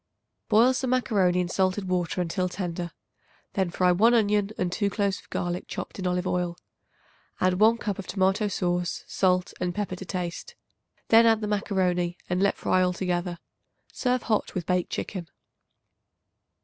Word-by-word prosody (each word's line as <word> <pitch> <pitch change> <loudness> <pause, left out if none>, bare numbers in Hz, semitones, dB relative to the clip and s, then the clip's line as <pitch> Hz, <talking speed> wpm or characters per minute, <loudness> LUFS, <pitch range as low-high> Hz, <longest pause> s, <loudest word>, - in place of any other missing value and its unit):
Boil 230 +4 +5
some 260 0 -2
macaroni 200 -8 +2
in 180 - 0
salted 190 +2 0
water 180 -1 0
until 180 +1 -1
tender. 175 -2 -4 0.6
Then 190 -3 0
fry 180 +1 +2
1 225 +7 +5
onion 205 -2 +2
and 180 -1 -1
2 200 +2 0
cloves 200 -2 -1
of - - -20
garlic 175 0 -3
chopped - - -6
in 185 - -1
olive 180 0 0
oil. 180 -1 -1 0.8
Add 185 0 +2
1 225 +2 +5
cup 205 -4 -3
of 195 - -6
tomato 195 +2 +1
sauce, 175 -2 -1
salt 180 -1 +1
and 180 -1 -1
pepper 205 -3 -2
to 185 - -8
taste. 175 -1 -5 0.5
Then 230 +1 +7
add 225 -1 +4
the 210 - -2
macaroni, 180 -4 0
and 180 +1 0
let 200 - +2
fry 185 - +2
altogether. 180 -1 -1 0.6
Serve 250 -1 0
hot 215 -3 -1
with 180 -3 -2
baked 180 0 0
chicken. 180 -5 -4
185 Hz, 160 wpm, -26 LUFS, 180-205 Hz, 0.8 s, Then